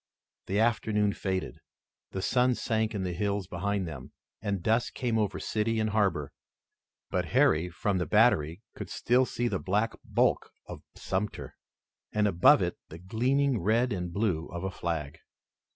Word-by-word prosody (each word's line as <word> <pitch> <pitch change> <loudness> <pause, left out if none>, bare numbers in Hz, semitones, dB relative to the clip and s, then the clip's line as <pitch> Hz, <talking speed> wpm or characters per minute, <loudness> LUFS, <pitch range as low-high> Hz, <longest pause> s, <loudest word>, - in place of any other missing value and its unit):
The 95 - -1
afternoon 105 -2 +2
faded. 95 -1 -3 0.5
The 95 - -4
sun 125 +2 +3
sank 110 -1 -1
in 100 - -2
the 90 -1 -2
hills 100 +2 -1
behind 95 +2 -2
them, 80 - -8 0.3
and 100 -4 -2
dusk 115 +2 +1
came 120 -3 0
over 105 -2 -1
city 110 +1 -1
and 110 0 0
harbor. 100 -9 +1 0.8
But - - 0
Harry, 80 +3 +3
from 95 +2 -1
the 90 - -2
battery, 80 +7 +3
could - - -7
still 125 +2 +2
see 120 - -1
the 100 -5 -1
black 105 +4 0
bulk - - +1 0.2
of - - -9
Sumter, 95 +2 -3 0.6
and 105 -1 +2
above 90 -3 +5
it - - -3
the 80 - -9
gleaming 125 +8 +1
red 115 +5 +2
and 90 -2 -3
blue 90 -4 -1
of 85 +1 -6
a 95 - -2
flag. 80 -5 -4
100 Hz, 160 wpm, -29 LUFS, 90-110 Hz, 0.8 s, above